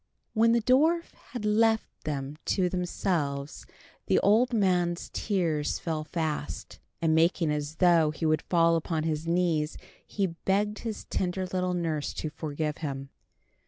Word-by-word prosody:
When 230 Hz, +1 st, +4 dB
the 235 Hz, -2 st, +2 dB
dwarf 315 Hz, +8 st, +3 dB, 0.2 s
had 240 Hz, -5 st, -5 dB
left 220 Hz, +1 st, +3 dB, 0.2 s
them 145 Hz, -1 st, -3 dB
to 185 Hz, -2 st, +1 dB
themselves 165 Hz, -6 st, -2 dB, 0.4 s
the -, -, +3 dB
old 225 Hz, +6 st, +4 dB
man's 180 Hz, -6 st, +1 dB
tears 165 Hz, -8 st, 0 dB
fell 160 Hz, -2 st, -3 dB
fast, 155 Hz, -2 st, -4 dB, 0.2 s
and 160 Hz, -1 st, +3 dB
making 165 Hz, 0 st, +3 dB
as 150 Hz, +1 st, -3 dB
though 170 Hz, -3 st, +4 dB
he 155 Hz, +2 st, -4 dB
would 155 Hz, 0 st, +2 dB
fall 165 Hz, -1 st, +3 dB
upon 160 Hz, -1 st, -2 dB
his 160 Hz, 0 st, -2 dB
knees, 165 Hz, -3 st, +1 dB, 0.3 s
he 200 Hz, -, -1 dB
begged 195 Hz, +4 st, -1 dB
his 225 Hz, -3 st, -5 dB
tender 185 Hz, 0 st, -2 dB
little 180 Hz, 0 st, -1 dB
nurse 160 Hz, -4 st, -2 dB
to 155 Hz, -, -4 dB
forgive 150 Hz, 0 st, -3 dB
him. 135 Hz, -3 st, -5 dB
170 Hz, 145 wpm, -28 LUFS, 155-195 Hz, 0.4 s, When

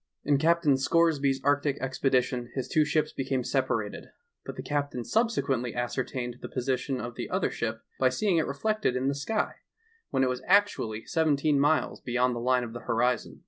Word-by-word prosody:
In 145 Hz, -1 st, +2 dB
Captain 160 Hz, -3 st, +3 dB
Scoresby's 140 Hz, -1 st, +2 dB
arctie 145 Hz, 0 st, +2 dB
expedition 130 Hz, -2 st, 0 dB
his 130 Hz, -, -2 dB
two 155 Hz, -, +3 dB
ships 155 Hz, 0 st, 0 dB
became 130 Hz, -1 st, -1 dB
separated, 120 Hz, -5 st, -1 dB, 0.4 s
but -, -, -7 dB
the -, -, -6 dB
captain 145 Hz, -4 st, -2 dB
subsequently 135 Hz, -, 0 dB
ascertained 120 Hz, 0 st, -3 dB
the -, -, -6 dB
position 130 Hz, +1 st, -2 dB
of 120 Hz, +2 st, -5 dB
the -, -, -6 dB
other -, -, 0 dB
ship -, -, -3 dB, 0.2 s
by 130 Hz, -, +4 dB
seeing 180 Hz, +7 st, +1 dB
it 160 Hz, -, +1 dB
reflected 215 Hz, -, 0 dB
in 130 Hz, +2 st, 0 dB
the -, -, 0 dB
sky, 210 Hz, +11 st, -2 dB, 0.5 s
when 135 Hz, -, +1 dB
it -, -, +3 dB
was 125 Hz, 0 st, -2 dB
actually 185 Hz, -, +2 dB
seventeen 150 Hz, -2 st, +2 dB
miles 145 Hz, -1 st, +1 dB
beyond 125 Hz, 0 st, +1 dB
the -, -, -3 dB
line 125 Hz, +1 st, +2 dB
of 115 Hz, -1 st, -7 dB
the 120 Hz, -, -6 dB
horizon. 125 Hz, +1 st, 0 dB
135 Hz, 180 wpm, -28 LUFS, 125-150 Hz, 0.5 s, by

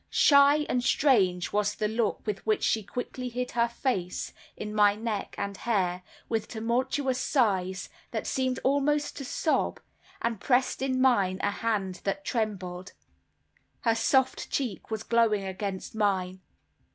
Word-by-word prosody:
Shy 285 Hz, +1 st, +5 dB
and 250 Hz, -1 st, 0 dB
strange 190 Hz, -, +2 dB
was 210 Hz, 0 st, +1 dB
the 215 Hz, -, 0 dB
look 220 Hz, 0 st, -1 dB
with 210 Hz, -3 st, -3 dB
which 430 Hz, -1 st, +1 dB
she 220 Hz, -, +2 dB
quickly 250 Hz, +4 st, -5 dB
hid 250 Hz, +1 st, -3 dB
her 235 Hz, 0 st, +2 dB
face 235 Hz, -7 st, -2 dB, 0.2 s
in 210 Hz, 0 st, -5 dB
my 205 Hz, -1 st, +5 dB
neck 215 Hz, -2 st, -4 dB
and 200 Hz, 0 st, -3 dB
hair, 185 Hz, -5 st, 0 dB, 0.3 s
with 225 Hz, -2 st, -1 dB
tumultuous 255 Hz, +4 st, -1 dB
sighs, 190 Hz, -10 st, +1 dB, 0.2 s
that -, -, -3 dB
seemed 260 Hz, -1 st, -1 dB
almost 290 Hz, +2 st, +1 dB
to 275 Hz, -, -5 dB
sob, 310 Hz, +4 st, 0 dB, 0.4 s
and 230 Hz, -3 st, -2 dB
pressed 250 Hz, +3 st, +1 dB
in 260 Hz, -1 st, 0 dB
mine 200 Hz, -8 st, +3 dB
a 205 Hz, -, +2 dB
hand 200 Hz, -4 st, -2 dB
that 250 Hz, +10 st, -2 dB
trembled. 190 Hz, -7 st, -3 dB, 0.9 s
Her 230 Hz, -, +3 dB
soft 260 Hz, +4 st, +1 dB
cheek 245 Hz, -9 st, -3 dB
was 220 Hz, -1 st, -3 dB
glowing 230 Hz, -4 st, +2 dB
against 190 Hz, 0 st, -4 dB
mine. 190 Hz, -3 st, 0 dB
225 Hz, 145 wpm, -28 LUFS, 200-255 Hz, 0.9 s, Shy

